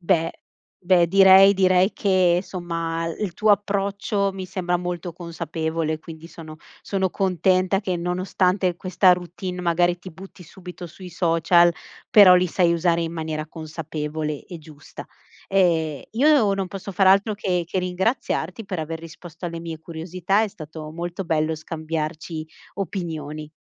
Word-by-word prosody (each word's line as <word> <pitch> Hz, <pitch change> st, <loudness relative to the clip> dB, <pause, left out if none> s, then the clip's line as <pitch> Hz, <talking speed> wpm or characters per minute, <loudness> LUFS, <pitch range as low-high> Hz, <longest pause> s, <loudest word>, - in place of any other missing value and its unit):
Beh 170 Hz, -2 st, +1 dB, 0.5 s
beh 175 Hz, -1 st, +4 dB
direi 195 Hz, +2 st, +7 dB
direi 185 Hz, +1 st, +3 dB
che 185 Hz, -3 st, +2 dB
somma, 165 Hz, -3 st, -4 dB
il 165 Hz, +6 st, -3 dB
l 175 Hz, -, -16 dB
tuo 215 Hz, +3 st, +2 dB
approccio 200 Hz, 0 st, -1 dB
mi 190 Hz, -1 st, -6 dB
sembra 180 Hz, -1 st, -1 dB
molto 175 Hz, -1 st, -5 dB
consapevole, 160 Hz, -1 st, -3 dB
quindi 165 Hz, -1 st, -11 dB
sono 160 Hz, -2 st, -11 dB, 0.2 s
sono 190 Hz, -2 st, -1 dB
contenta 185 Hz, 0 st, +1 dB
che 185 Hz, -3 st, -2 dB
nonostante 180 Hz, +1 st, 0 dB
questa 185 Hz, 0 st, +3 dB
routine, 180 Hz, +1 st, -5 dB
magari 175 Hz, 0 st, +1 dB
ti 185 Hz, -, -9 dB
butti 190 Hz, +2 st, -13 dB
subito 180 Hz, +1 st, -10 dB
sui 180 Hz, +3 st, -11 dB
social, 170 Hz, 0 st, +3 dB, 0.4 s
però 200 Hz, -5 st, +8 dB
li 180 Hz, 0 st, +3 dB
sai 170 Hz, 0 st, +2 dB
usare 170 Hz, 0 st, +1 dB
in 165 Hz, 0 st, -4 dB
maniera 155 Hz, -1 st, -4 dB
consapevole 155 Hz, -1 st, -5 dB
e 175 Hz, -3 st, -9 dB
giusta. 155 Hz, -1 st, -12 dB, 0.4 s
Ehm, 165 Hz, -6 st, +1 dB
io 265 Hz, -4 st, +4 dB
non 195 Hz, -1 st, -2 dB
posso 195 Hz, +2 st, -7 dB
far 190 Hz, 0 st, +2 dB
altro 200 Hz, +3 st, +4 dB
che 180 Hz, -4 st, -1 dB
che 175 Hz, +3 st, -3 dB
ringraziarti 185 Hz, +1 st, -2 dB
per 185 Hz, -4 st, -4 dB
aver 160 Hz, +1 st, -5 dB
risposto 165 Hz, +1 st, -10 dB
alle 170 Hz, 0 st, -5 dB
mie 165 Hz, -1 st, -6 dB
curiosità, 175 Hz, +5 st, -1 dB
è 220 Hz, -, 0 dB
stato 155 Hz, -5 st, -9 dB
molto 175 Hz, +3 st, -5 dB
bello 160 Hz, -1 st, 0 dB
scambiarci 155 Hz, 0 st, -5 dB, 0.3 s
opinioni. 155 Hz, -5 st, -5 dB
175 Hz, 145 wpm, -23 LUFS, 165-190 Hz, 0.5 s, però